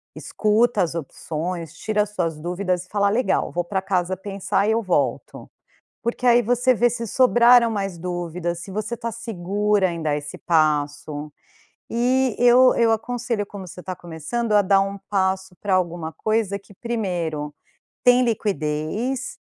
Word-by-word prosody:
Escuta 215 Hz, 0 st, +1 dB
as 165 Hz, -, -2 dB
opções, 165 Hz, +1 st, -5 dB
tira 210 Hz, +3 st, 0 dB
as 210 Hz, -, -8 dB
suas 165 Hz, -6 st, -2 dB
dúvidas 180 Hz, +2 st, -2 dB
e -, -, -28 dB
fala: 200 Hz, -1 st, +2 dB
“Legal, 235 Hz, +4 st, +1 dB
vou 175 Hz, -, -1 dB
pra 190 Hz, +2 st, -2 dB
casa 185 Hz, -1 st, 0 dB
pensar 195 Hz, +1 st, -1 dB
e -, -, +3 dB
eu 225 Hz, +1 st, +1 dB
volto”. 185 Hz, -4 st, -2 dB, 0.5 s
Porque 240 Hz, +2 st, -2 dB
aí 240 Hz, 0 st, +6 dB
você 245 Hz, +3 st, +3 dB
vê 240 Hz, +1 st, +3 dB
se 230 Hz, 0 st, -4 dB
sobraram 240 Hz, 0 st, +5 dB
mais 195 Hz, -5 st, -3 dB
dúvidas, 175 Hz, -1 st, -3 dB
se 190 Hz, -, -9 dB
você 215 Hz, +4 st, -3 dB
está 230 Hz, 0 st, -4 dB
segura 205 Hz, -3 st, 0 dB
em 170 Hz, -, -5 dB
dar 150 Hz, -2 st, 0 dB
esse 150 Hz, 0 st, -7 dB
passo. 150 Hz, -2 st, 0 dB, 0.6 s
E 250 Hz, 0 st, +1 dB
eu 245 Hz, +1 st, +6 dB
eu 230 Hz, -1 st, +3 dB
aconselho, 235 Hz, -1 st, -2 dB
como 195 Hz, -2 st, -9 dB
você 180 Hz, -, -10 dB
está 185 Hz, 0 st, -5 dB
começando, 175 Hz, +8 st, -3 dB
a 205 Hz, -, +6 dB
dar 195 Hz, 0 st, +4 dB
um 195 Hz, 0 st, -3 dB
passo 190 Hz, -1 st, 0 dB
para 200 Hz, -2 st, 0 dB
alguma 170 Hz, -3 st, -1 dB
coisa 215 Hz, -2 st, 0 dB
que 200 Hz, -, -18 dB
primeiro: 175 Hz, -10 st, -3 dB, 0.5 s
tem 250 Hz, 0 st, +5 dB
liquidez, 210 Hz, -, -2 dB
200 Hz, 160 wpm, -22 LUFS, 175-230 Hz, 0.6 s, aí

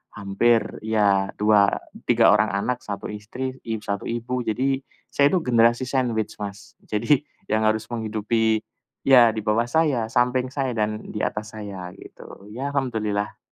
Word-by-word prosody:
hampir, 110 Hz, +3 st, +2 dB, 0.2 s
iya 100 Hz, -3 st, +2 dB
dua 105 Hz, -1 st, +4 dB, 0.4 s
tiga -, -, +5 dB
orang 105 Hz, +1 st, +4 dB
anak, 100 Hz, +5 st, -1 dB
1 100 Hz, 0 st, -6 dB
istri, 125 Hz, +6 st, -6 dB
i 110 Hz, -, -1 dB
satu 100 Hz, 0 st, -3 dB
ibu. 120 Hz, +2 st, -2 dB
Jadi, 135 Hz, +4 st, 0 dB, 0.3 s
saya 140 Hz, 0 st, +4 dB
itu 180 Hz, +1 st, +1 dB
generasi 120 Hz, 0 st, +3 dB
sandwich 125 Hz, -6 st, -1 dB
Mas. 100 Hz, 0 st, -8 dB
Jadi, 145 Hz, +7 st, +1 dB, 0.2 s
yang 110 Hz, 0 st, +2 dB
harus 110 Hz, 0 st, +1 dB
menghidupi 110 Hz, 0 st, 0 dB, 0.4 s
iya 120 Hz, -4 st, +6 dB
di 110 Hz, -, -3 dB
bawah 115 Hz, +2 st, +1 dB
saya, 135 Hz, -6 st, +1 dB
samping 125 Hz, +1 st, +1 dB
saya 130 Hz, -1 st, -2 dB
dan 105 Hz, -1 st, -2 dB
di 105 Hz, -, -5 dB
atas 110 Hz, +1 st, -3 dB
saya 95 Hz, -4 st, -7 dB
gitu, 100 Hz, -, -13 dB
iya 135 Hz, +5 st, -4 dB
Alhamdulillah. 105 Hz, -6 st, -1 dB
110 Hz, 150 wpm, -24 LUFS, 105-125 Hz, 0.4 s, iya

